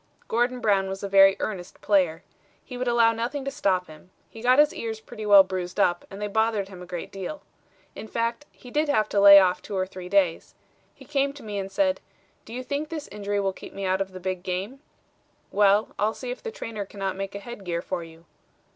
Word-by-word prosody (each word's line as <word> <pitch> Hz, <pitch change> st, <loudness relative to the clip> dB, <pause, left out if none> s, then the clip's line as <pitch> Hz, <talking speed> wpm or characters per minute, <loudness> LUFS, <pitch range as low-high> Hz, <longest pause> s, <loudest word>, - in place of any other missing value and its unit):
Gordon 245 Hz, +2 st, 0 dB
Brown 195 Hz, -3 st, +2 dB
was 195 Hz, +1 st, -6 dB
a -, -, -1 dB
very 195 Hz, 0 st, +6 dB
earnest 185 Hz, -5 st, -5 dB
player. 185 Hz, -4 st, +1 dB, 0.4 s
He 250 Hz, -, -8 dB
would 250 Hz, 0 st, -3 dB
allow 235 Hz, -1 st, +4 dB
nothing 245 Hz, +5 st, -3 dB
to 275 Hz, -, -2 dB
stop 195 Hz, -10 st, 0 dB
him. 155 Hz, +3 st, -15 dB, 0.2 s
He 225 Hz, -, -10 dB
got 250 Hz, +2 st, +4 dB
his 295 Hz, 0 st, +5 dB
ears 225 Hz, -1 st, -5 dB
pretty 220 Hz, -1 st, -8 dB
well 200 Hz, -1 st, +9 dB
bruised 185 Hz, -2 st, -5 dB
up 175 Hz, 0 st, +2 dB
and 195 Hz, -, -9 dB
they 210 Hz, -, -2 dB
bothered 220 Hz, -1 st, 0 dB
him 185 Hz, -2 st, -11 dB
a 180 Hz, -, -10 dB
great 175 Hz, -1 st, -6 dB
deal. 195 Hz, +10 st, -6 dB, 0.5 s
In -, -, -8 dB
fact, 230 Hz, +5 st, -2 dB
he 250 Hz, -, -14 dB
did 300 Hz, +2 st, +1 dB
have 215 Hz, -7 st, +2 dB
to 205 Hz, -, +1 dB
lay 200 Hz, 0 st, +11 dB
off 185 Hz, -2 st, +4 dB
two 200 Hz, -, -5 dB
or 185 Hz, -, +1 dB
three 185 Hz, -1 st, -9 dB
days. 185 Hz, -4 st, +1 dB, 0.4 s
He -, -, -15 dB
came 280 Hz, -1 st, 0 dB
to 285 Hz, -, -12 dB
me 205 Hz, -2 st, -4 dB
and 195 Hz, 0 st, -5 dB
said, 280 Hz, +5 st, +1 dB, 0.4 s
'Do -, -, -12 dB
you 255 Hz, -, -4 dB
think 285 Hz, +4 st, -3 dB
this 310 Hz, -3 st, -6 dB
injury 205 Hz, 0 st, -2 dB
will 195 Hz, -1 st, 0 dB
keep -, -, -12 dB
me 195 Hz, 0 st, -4 dB
out 190 Hz, +1 st, +1 dB
of 195 Hz, 0 st, -3 dB
the 185 Hz, -, -9 dB
big 185 Hz, 0 st, -3 dB
game?' 190 Hz, +8 st, -4 dB, 0.7 s
'Well, 205 Hz, +1 st, +4 dB
I'll 215 Hz, +2 st, +1 dB
see 250 Hz, -1 st, -5 dB
if 250 Hz, -, -7 dB
the 460 Hz, -, -5 dB
trainer 225 Hz, -, -6 dB
cannot 195 Hz, -1 st, -4 dB
make 195 Hz, +1 st, -5 dB
a -, -, -4 dB
head 220 Hz, 0 st, -9 dB
gear 170 Hz, -1 st, -3 dB
for 180 Hz, -2 st, -3 dB
you.' 165 Hz, 0 st, -15 dB
200 Hz, 235 wpm, -25 LUFS, 190-240 Hz, 0.7 s, lay